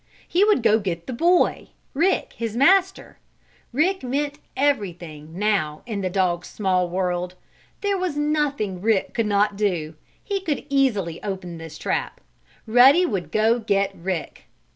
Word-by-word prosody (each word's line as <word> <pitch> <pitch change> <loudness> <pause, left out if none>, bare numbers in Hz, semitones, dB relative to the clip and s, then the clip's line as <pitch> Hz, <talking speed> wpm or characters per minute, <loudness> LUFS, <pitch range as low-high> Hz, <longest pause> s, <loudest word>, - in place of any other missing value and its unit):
He 365 +3 +3
would 415 - +3
go 220 0 +4
get 175 -5 -4
the 260 - -5
Boy 345 +8 +2 0.2
Rick, 345 +7 +1
his 230 -1 -4
master. 380 +7 +2 0.5
Rick 355 +9 +1
meant 285 +3 -2 0.2
everything, 175 - -2
now, 195 -8 0
in 215 -4 -4
the 185 - -1
dog's 180 -2 0
small 185 -3 0
world. 180 0 -2 0.5
There 400 -2 0
was 360 -5 -2
nothing 290 -11 -1
Rick 215 -2 +1
could 230 -2 0
not 205 0 +2
do. 175 -7 -1 0.3
He 400 -2 -2
could 305 -8 -3
easily 210 -12 +1
open 185 -4 -5
this 165 -1 -9
trap. - - -3 0.5
Ruddy 255 +10 +6
would 195 - -3
go 225 +3 +2
get 200 -3 0
Rick. 175 -2 -5
215 Hz, 145 wpm, -23 LUFS, 180-285 Hz, 0.5 s, Ruddy